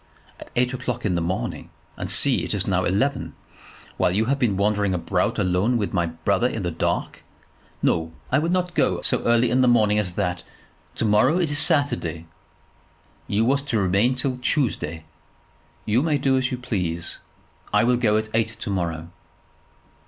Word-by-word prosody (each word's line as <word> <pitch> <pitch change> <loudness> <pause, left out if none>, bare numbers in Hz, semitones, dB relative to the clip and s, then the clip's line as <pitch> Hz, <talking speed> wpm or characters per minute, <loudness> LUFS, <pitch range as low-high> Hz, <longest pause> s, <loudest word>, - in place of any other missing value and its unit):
"At - - -11
eight 125 +1 +1
o'clock 125 -3 -4
in 100 - +1
the 85 - 0
morning, 90 +3 -3 0.3
and - - -5
see, - - +4
it - - -2
is - - -1
now - - 0
eleven; 110 +10 -1 0.6
while - - +2
you 100 +5 +1
have 140 +3 0
been 110 -7 +1
wandering 100 -1 +1
about 85 - -1
alone 95 +7 +1
with 105 -3 -2
my 85 -3 +1
brother 80 +9 0
in 115 -5 -4
the 90 - -2
dark! 80 - -2 0.6
No; 80 -1 +1 0.2
I 135 - +4
will 165 +3 -1
not 180 0 0
go - - +1
so - - +1
early 120 0 +3
morning 120 -5 +3
as 90 -4 -2
that. 90 -3 -2 0.5
To - - -1
morrow 105 +10 +3
is 160 -5 0
Saturday 140 - +1 1.0
you 105 +3 +1
was 140 +3 +2
to 140 -5 -2
remain 100 +6 +2
till 130 0 -2
Tuesday." 105 - -1 0.8
"You 110 +4 +2
may 155 -1 +1
do 135 -1 +1
as 130 0 +1
you 125 - -2
please. 90 -9 -3 0.5
I - - +3
shall 125 +1 +3
go 110 -3 +2
at 110 0 -2
eight 115 0 -1
to - - -4
morrow." 85 -3 -3
110 Hz, 175 wpm, -23 LUFS, 90-130 Hz, 1.0 s, see